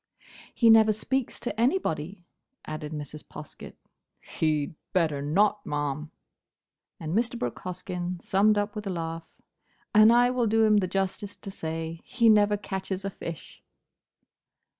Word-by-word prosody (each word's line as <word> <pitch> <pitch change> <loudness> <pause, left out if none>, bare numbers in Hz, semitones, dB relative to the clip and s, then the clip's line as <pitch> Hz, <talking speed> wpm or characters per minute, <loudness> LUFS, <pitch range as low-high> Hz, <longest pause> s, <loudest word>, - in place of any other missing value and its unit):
"He 230 -2 +6
never 220 -1 +7
speaks 250 +4 -2
to 225 -3 -4
anybody," 190 - -1 0.4
added 155 0 -6
Mrs. 150 -1 -7
Poskett. 150 -1 -11 0.4
"He'd 155 -2 -1 0.2
better 160 -6 +1
not, 205 +8 +2
ma'am!" 145 +1 -3 0.9
And 160 0 -4
Mr. 235 +2 0
Brooke 120 - -4
Hoskyn 180 -1 -4
summed 205 +4 +3
up 205 +1 -1
with 210 -1 -5
a - - -1
laugh, 165 -2 -4 0.6
"And 215 +1 +8
I 245 +1 +5
will 250 -2 +1
do 225 +1 +3
him 215 -1 +5
the 190 -3 +2
justice 195 +2 -2
to 195 - -9
say, 165 -2 -5
he 235 -2 +2
never 210 -1 +5
catches 190 -1 -4
a 195 - -2
fish!" 170 -4 -8
190 Hz, 140 wpm, -27 LUFS, 160-215 Hz, 0.9 s, And